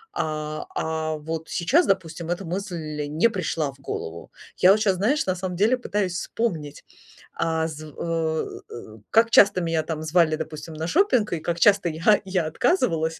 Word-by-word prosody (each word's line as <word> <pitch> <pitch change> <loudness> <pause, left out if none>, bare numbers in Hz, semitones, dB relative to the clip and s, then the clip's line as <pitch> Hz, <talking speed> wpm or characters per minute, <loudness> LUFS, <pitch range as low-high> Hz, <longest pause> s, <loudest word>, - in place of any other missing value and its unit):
а, 155 - -3
а, 160 0 -2
вот 160 +1 -5
сейчас, 280 - +2
допустим, 170 -3 -1
эта 175 +2 -2
мысль 165 -5 -4
не 160 +10 +2
пришла 165 -7 -2
в 135 - -21
голову. 85 -10 -6 0.3
Я 185 - +6
вот 210 - +4
сейчас, 200 -3 +2
знаешь, 250 +11 +1
на 185 - +1
самом 180 -1 -4
деле 215 +7 +3
пытаюсь 205 -6 -2
вспомнить, 165 -7 -3 0.5
а 160 0 0
зв 155 -1 -8
э, 165 -1 -2 0.5
как 230 +1 +4
часто 200 -2 +6
меня 165 -1 0
там 155 0 -4
звали, 160 0 +3
допустим, 155 +1 -7
на 160 +1 -4
шопинг, 255 - +2
и 170 - -1
как 170 +2 -3
часто 200 -2 +4
я 165 +7 +3
я 185 -3 0
отказывалась, 160 - 0
165 Hz, 170 wpm, -24 LUFS, 155-195 Hz, 0.5 s, Я